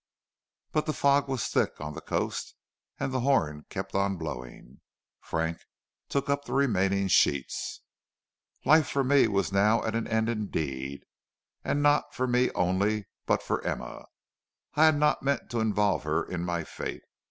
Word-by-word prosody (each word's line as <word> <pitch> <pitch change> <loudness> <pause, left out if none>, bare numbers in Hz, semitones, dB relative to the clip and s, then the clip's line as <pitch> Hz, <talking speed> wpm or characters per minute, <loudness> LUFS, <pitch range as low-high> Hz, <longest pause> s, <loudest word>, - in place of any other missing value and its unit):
But 155 - 0
the 155 - 0
fog 140 0 +3
was 130 -6 -1
thick - - 0
on 75 +1 -5
the - - -7
coast - - -3 0.4
and 135 - -2
the 130 - +1
horn 80 - +1
kept - - -5
on 100 0 +1
blowing. 60 -5 -8 0.4
Frank 80 0 -2 0.5
took 140 0 -1
up 140 0 0
the - - -5
remaining 100 -7 +2
sheets. 70 -7 +1 0.8
"Life 155 0 +6
for 140 - +1
me 140 +1 +5
was 100 -2 0
now 105 +3 +3
at 110 - -2
an 115 0 -1
end 110 0 +1
indeed, 70 - -3 0.6
and 145 - 0
not 145 0 +3
for 130 - 0
me 125 0 +2
only, 100 +3 +1 0.2
but - - +2
for - - -2
Emma. - - -4 0.7
I 155 +2 +5
had 155 -2 +5
not 150 0 +2
meant 140 -4 -1
to 120 - -1
involve 105 -2 +2
her 80 +2 0
in 85 -1 -4
my 85 -1 -1
fate. - - -6
105 Hz, 165 wpm, -28 LUFS, 85-135 Hz, 0.8 s, Life